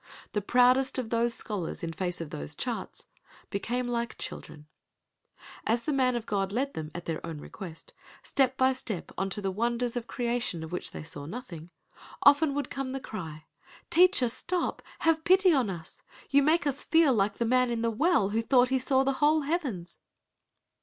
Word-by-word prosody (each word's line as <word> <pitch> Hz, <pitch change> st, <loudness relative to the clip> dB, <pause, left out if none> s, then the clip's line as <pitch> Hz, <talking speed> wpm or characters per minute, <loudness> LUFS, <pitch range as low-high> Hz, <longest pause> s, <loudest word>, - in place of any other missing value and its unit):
The 210 Hz, -, -1 dB
proudest 250 Hz, +5 st, +3 dB
of 245 Hz, -4 st, -3 dB
those 235 Hz, 0 st, +1 dB
scholars 195 Hz, -7 st, -4 dB
in 165 Hz, -1 st, -3 dB
face 180 Hz, 0 st, -3 dB
of 160 Hz, -, -6 dB
those 70 Hz, 0 st, -6 dB
charts -, -, -4 dB, 0.5 s
became 240 Hz, +5 st, -2 dB
like 235 Hz, -1 st, -2 dB
children. 150 Hz, -1 st, -7 dB, 1.0 s
As 235 Hz, +2 st, +1 dB
the 305 Hz, -, -1 dB
man 255 Hz, -2 st, +2 dB
of 235 Hz, -2 st, -3 dB
God 195 Hz, -3 st, -1 dB
led 270 Hz, +6 st, -1 dB
them 155 Hz, -1 st, -5 dB
(at 175 Hz, -, -6 dB
their 165 Hz, -1 st, -3 dB
own 165 Hz, -2 st, -5 dB
request) 165 Hz, +2 st, -10 dB, 0.3 s
step 265 Hz, -2 st, +1 dB
by 260 Hz, 0 st, +4 dB
step 225 Hz, -8 st, -5 dB
on 195 Hz, -, -1 dB
into 200 Hz, +1 st, -4 dB
the 195 Hz, -, 0 dB
wonders 235 Hz, +4 st, -1 dB
of 245 Hz, -1 st, -3 dB
creation 235 Hz, -8 st, -2 dB
of 160 Hz, -, -8 dB
which 180 Hz, -, -4 dB
they -, -, -8 dB
knew 145 Hz, -1 st, -7 dB
nothing—often 250 Hz, -, 0 dB
would 285 Hz, -3 st, -3 dB
come 270 Hz, -1 st, -3 dB
the 270 Hz, -, -3 dB
cry, 160 Hz, -10 st, -7 dB, 0.5 s
"Teacher 360 Hz, -6 st, +5 dB
stop, 345 Hz, +9 st, -2 dB, 0.2 s
have 320 Hz, -1 st, +2 dB
pity 370 Hz, +1 st, +5 dB
on 255 Hz, -8 st, +2 dB
us—you 185 Hz, -, -2 dB
make 310 Hz, +2 st, +3 dB
us 285 Hz, -1 st, 0 dB
feel 320 Hz, -3 st, +4 dB
like 200 Hz, -2 st, +1 dB
the 235 Hz, -, 0 dB
man 250 Hz, +1 st, +3 dB
in 235 Hz, -1 st, -1 dB
the 230 Hz, -, +1 dB
well 285 Hz, -, +2 dB
who 220 Hz, +2 st, 0 dB
thought 250 Hz, +2 st, +4 dB
he 265 Hz, 0 st, +2 dB
saw 265 Hz, +1 st, +2 dB
the 275 Hz, 0 st, +1 dB
whole 305 Hz, +1 st, +4 dB
heavens!" 270 Hz, -, -3 dB
240 Hz, 185 wpm, -29 LUFS, 195-270 Hz, 1.0 s, Teacher